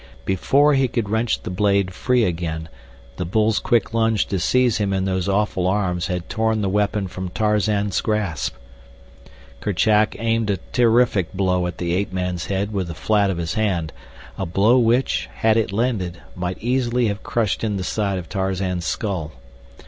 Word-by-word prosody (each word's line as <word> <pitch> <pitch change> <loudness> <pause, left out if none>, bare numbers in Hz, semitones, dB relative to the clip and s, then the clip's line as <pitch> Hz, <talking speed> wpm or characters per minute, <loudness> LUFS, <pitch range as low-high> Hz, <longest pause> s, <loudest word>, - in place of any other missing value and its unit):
Before 140 +10 +3
he 135 -1 +3
could 115 -4 -2
wrench 110 +1 0
the - - -5
blade 100 -1 +1
free 125 +4 +1
again, 80 -3 -2 0.5
the - - -2
bull's 105 +4 +1
quick 115 -1 +1
lunge 115 -2 +2
to 95 - -1
seize 125 +5 +2
him 100 -2 0
in 95 0 0
those 95 0 -1
awful 95 -2 +1
arms 95 -3 0
had 90 -1 -3
torn 110 -1 0
the 95 - +1
weapon 105 0 0
from 95 0 -5
Tarzan's 105 -1 +1
grasp. 100 -10 -1 1.0
Kerchak 105 +2 +2
aimed 115 -1 0
a 100 - +1 0.2
terrific 115 -6 +3
blow 90 -2 +1
at 90 - -6
the 85 -1 -2
ape 95 +1 -1
man's 90 -2 -3
head 100 +2 -2
with 95 -3 -1
the 85 - -6
flat 100 +4 +2
of 95 - -2
his 80 -1 -2
hand, 90 -7 -1 0.5
a - - -1
blow 105 +8 +4
which, 120 +2 +1
had 110 -1 +2
it 115 -3 +1
landed, 100 -6 -1 0.2
might 90 0 -3
easily 125 0 +1
have 100 0 -3
crushed 115 -3 -1
in 105 -3 0
the 95 - -3
side 100 0 -1
of 90 -3 -6
Tarzan's 95 -2 -2
skull. 90 -8 -2
100 Hz, 175 wpm, -22 LUFS, 90-110 Hz, 1.0 s, blow